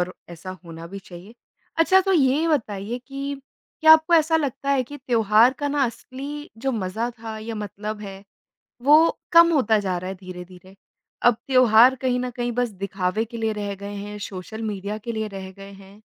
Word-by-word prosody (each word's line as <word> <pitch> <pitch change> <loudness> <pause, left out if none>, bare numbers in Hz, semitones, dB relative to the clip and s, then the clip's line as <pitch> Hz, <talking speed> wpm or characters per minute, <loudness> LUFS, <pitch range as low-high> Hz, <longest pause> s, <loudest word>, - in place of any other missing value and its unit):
और 180 +1 -2 0.2
ऐसा 170 +2 -8
होना 165 0 -9
भी 195 +3 -8
चाहिए। 190 +3 -13 0.4
अच्छा 350 +4 +5
तो 385 0 0
ये 295 -1 +3
बताइए 220 -6 -2
कि, 275 0 -5 0.4
क्या 315 0 +9
आपको 320 +2 +5
ऐसा 320 0 +4
लगता 280 -2 -2
है 275 -2 +3
कि 290 +4 -10
त्योहार 230 -2 +3
का 290 - -1
ना 285 -1 +1
असली 280 +5 -7
जो 270 +3 -1
मज़ा 220 +2 -2
था 220 -1 -7
या 225 +1 -6
मतलब 210 0 -6
है, 195 -2 -9 0.6
वो 305 +5 +5
कम 335 0 +7
होता 225 -8 +3
जा 190 -3 -2
रहा 185 +1 -6
है - - -5
धीरे-धीरे? 185 +1 -11 0.5
अब 240 -2 +5
त्योहार 255 -2 +6
कहीं 255 -1 0
न 250 0 -3
कहीं 240 -1 -2
बस 245 +1 0 0.2
दिखावे 195 +2 -1
के 230 +1 -10
लिए 225 -1 -1
रह 205 -1 -4
गए 200 +1 -8
हैं, 205 +1 -7
सोशल 205 +2 -7
मीडिया 205 -1 -4
के 235 +2 -6
लिए 220 -1 -3
रह 195 -2 -8
गए 195 0 -11
हैं? 195 +1 -16
220 Hz, 195 wpm, -23 LUFS, 200-270 Hz, 0.6 s, क्या